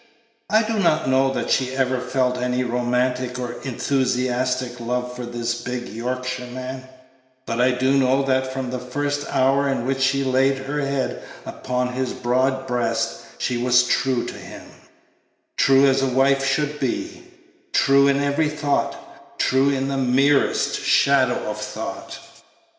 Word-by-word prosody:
I 215 +1 +4
do 220 0 -2
not 160 -6 +2
know 135 +1 +3
that - - -3
she 130 0 +1
ever 130 -1 +1
felt 125 0 0
any 125 0 0
romantic 125 +1 -1
or 120 -1 -5
enthusiastic 125 -1 -1
love 125 +1 -3
for 125 -1 -6
this 120 0 -3
big 125 0 -4
Yorkshireman; 125 +2 -5 0.6
but 115 0 -1
I 125 - +4
do 130 +2 +1
know 135 0 +3
that 130 -1 0
from 130 -1 -4
the 125 - -3
first 145 +3 -3
hour 135 +1 +2
in 135 -3 -1
which 135 0 -1
she 135 +1 +2
laid 135 +1 +2
her 140 +2 -4
head 140 -1 -2 0.2
upon 125 0 -3
his 130 0 -2
broad 130 +2 0
breast 115 -3 -1 0.2
she 125 - -1
was 125 +1 +4
true 125 0 0
to - - -6
him - - -10 0.9
true 135 +1 +5
as 135 0 +3
a 135 - +1
wife 135 +1 +2
should 150 +2 0
be; 330 +1 -3 0.5
true 140 0 +4
in 140 0 +2
every 145 +2 +1
thought, 145 -1 -3
true 135 +1 +2
in 135 -1 0
the 135 0 -2
merest 135 +2 +2
shadow 130 -3 +3
of 105 0 -4
a - - -7
thought. - - -6
130 Hz, 155 wpm, -22 LUFS, 125-135 Hz, 0.9 s, true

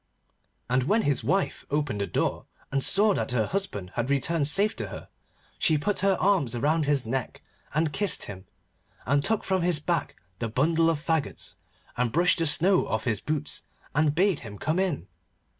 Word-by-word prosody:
And 125 +1 +1
when 215 +8 +2
his 145 -2 +1
wife 195 0 0
opened 145 -8 -1
the 100 - -1
door - - -1 0.3
and 135 0 0
saw 205 +1 +4
that 130 - -2
her 110 -3 +2
husband 105 - -4
had 120 +2 -2
returned 140 +2 +1
safe 200 +8 +2
to - - -3
her, - - -9 0.5
she 155 - +3
put 200 +8 -1
her 195 0 +2
arms 175 - +2
round 150 +4 +1
his 145 -4 +2
neck 130 +2 -4 0.3
and 155 0 0
kissed 205 -2 +2
him, 95 -2 -9 0.6
and 140 +5 +2
took 220 +4 +1
from 190 -1 0
his 170 -3 +3
back 170 +3 -1 0.2
the 115 - -2
bundle 160 +7 +2
of 165 - +1
faggots, 160 -2 -2 0.4
and 120 -1 +1
brushed 175 +5 +3
the 165 - +2
snow 180 +5 +4
off 110 0 -1
his 110 -5 -1
boots, 150 -1 -3 0.3
and 150 0 +2
bade 190 -2 +2
him 105 -3 -9
come 155 - -1
in. 175 - -1
150 Hz, 185 wpm, -27 LUFS, 130-180 Hz, 0.6 s, saw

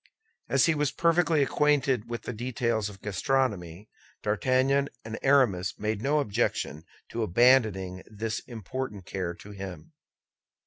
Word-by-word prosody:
As - - +4
he 165 - +3
was 150 -2 +1
perfectly 165 -3 +3
acquainted 135 -4 +1
with 120 -2 -4
the - - -4
details 115 -2 -1
of 100 -2 -14
gastronomy, 105 - -1 0.4
D'Artagnan 130 +6 +2 0.2
and 110 0 -5
Aramis 120 -10 +3
made 110 0 -2
no 145 +5 +2
objection 100 - -1 0.2
to 115 - -3
abandoning 105 -4 +3
this 110 +1 -3
important 115 -3 -5
care 90 -3 -3
to 105 - -12
him. 95 -5 -8
115 Hz, 130 wpm, -28 LUFS, 100-135 Hz, 0.4 s, As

